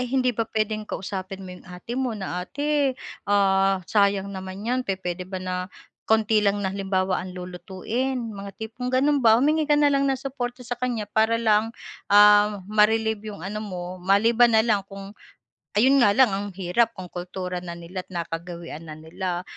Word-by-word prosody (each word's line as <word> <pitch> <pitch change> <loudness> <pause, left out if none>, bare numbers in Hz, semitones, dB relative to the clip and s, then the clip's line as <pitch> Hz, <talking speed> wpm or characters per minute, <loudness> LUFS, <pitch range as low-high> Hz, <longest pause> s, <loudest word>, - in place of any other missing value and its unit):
Ay, 250 - -1
hindi 255 -1 +3
ba 230 - +2
puwedeng 215 0 -1
kausapin 190 0 -5
mo 185 - -8
'yong 180 - -16
ate 180 +6 -8
mo 250 - -1
na, 190 - -4 0.2
"Ate, 290 +8 -4 0.7
ah, 195 -1 +3 0.2
sayang 200 -2 +3
naman 190 +2 -7
'yan, 250 +2 +1
pupuwede 185 -2 -3
ba - - -2
na 185 - -1 0.6
konti 220 0 +3
lang, 200 0 +3
na 190 - -1
halimbawa 190 -1 0
ang 185 0 -7
lulutuin", 190 +9 -3 0.2
mga 200 0 -6
tipong 230 +3 -5
gao'n 280 +2 +3
ba. 225 0 +7
Humingi 305 +5 +2
ka 295 - +6
na 290 -1 +4
lang 275 0 +2
ng 270 - +1
suporta 250 -2 -4
sa 245 - -2
kanya 240 -4 -1
para 220 +1 +4
lang, 210 0 +5 0.4
ah, 205 -1 +6
ma-relieve 220 0 +3
'yong 200 - -10
ano 210 +1 -4
mo, 180 -1 -5 0.3
maliban 230 +4 +5
na 220 - +5
lang 215 -4 +2
kung 195 0 -9 0.7
ayun 265 +5 +5
nga 205 -5 +5
lang, 255 -3 +5
ang 200 +1 -3
hirap 195 +5 +1
kung 185 -2 -9
kultura 180 0 -5
na 175 -1 -7
nila't 175 +2 -7
nakagawian 170 -1 -6
na 155 - -7
nila, 175 +3 -4
205 Hz, 180 wpm, -24 LUFS, 185-230 Hz, 0.7 s, ba